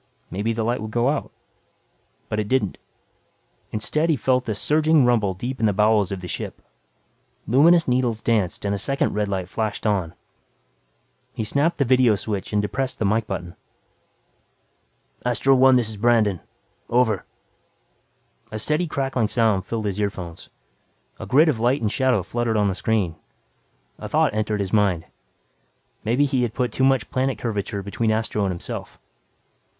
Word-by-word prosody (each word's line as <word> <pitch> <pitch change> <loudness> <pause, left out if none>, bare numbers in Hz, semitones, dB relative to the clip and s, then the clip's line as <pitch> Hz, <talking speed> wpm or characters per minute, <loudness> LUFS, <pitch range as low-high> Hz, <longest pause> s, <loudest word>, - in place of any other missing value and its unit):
Maybe 105 +5 -1
the 115 0 -2
light 120 +1 -1
would 110 - -5
go 120 +4 +1
out. 150 - -2 1.0
But 105 - -2
it 105 - -2
didn't. 125 -5 0 0.9
Instead 150 +10 0
he 160 - +4
felt 130 -1 0
a 110 - -1
surging 155 +4 +3
rumble 110 -6 +2
deep 125 +7 -5
in 110 - +3
the 105 - +1
bowels 105 -1 +3
of 95 -2 -4
the 90 - -7
ship. - - -5 0.9
Luminous 165 +8 +5
needles 125 -3 +1
danced 105 -5 0
and 100 - 0
a 100 - -2
second 135 +7 0
red 105 0 0
light 95 -2 -3
flashed 110 +2 -3
on. 95 -6 0 1.2
He - - -3
snapped 145 +9 +1
the 140 - +2
vidio 125 -3 +4
switch 100 -1 -4
and 105 - +1
depressed 130 +5 -2
the 110 - -1
mike 110 +2 +1
button. 90 -3 -5 1.7
"Astro 125 +2 +2
One, 130 0 +6
this 120 -3 +1
is 110 - -8
Brandon. 110 -4 +2 0.5
Over." 115 -5 +2 1.3
A 110 - -4
steady 150 +10 0
crackling 135 -6 -1
sound 110 -5 +1
filled 110 -2 -3
his 100 0 -2
earphones; 90 -5 -5 0.7
a - - -7
grid 150 +6 +5
of 140 -8 +1
light 125 +5 +2
and 105 -2 0
shadow 130 -7 +1
fluttered 115 +3 -1
on 105 -1 +2
the - - -1
screen. 95 -5 -1 0.8
A - - -7
thought - - +2
entered 105 -1 -1
his 95 0 -4
mind. 100 -6 +2 1.0
Maybe 120 +6 +2
he 135 -2 0
had 120 -3 -2
put 125 -3 0
too 130 - -1
much 135 -5 +2
planet 130 -2 0
curvature 105 -3 -3
between 110 +3 -1
Astro 110 -1 -1
and 95 - 0
himself. 85 - -6
110 Hz, 165 wpm, -23 LUFS, 105-130 Hz, 1.7 s, One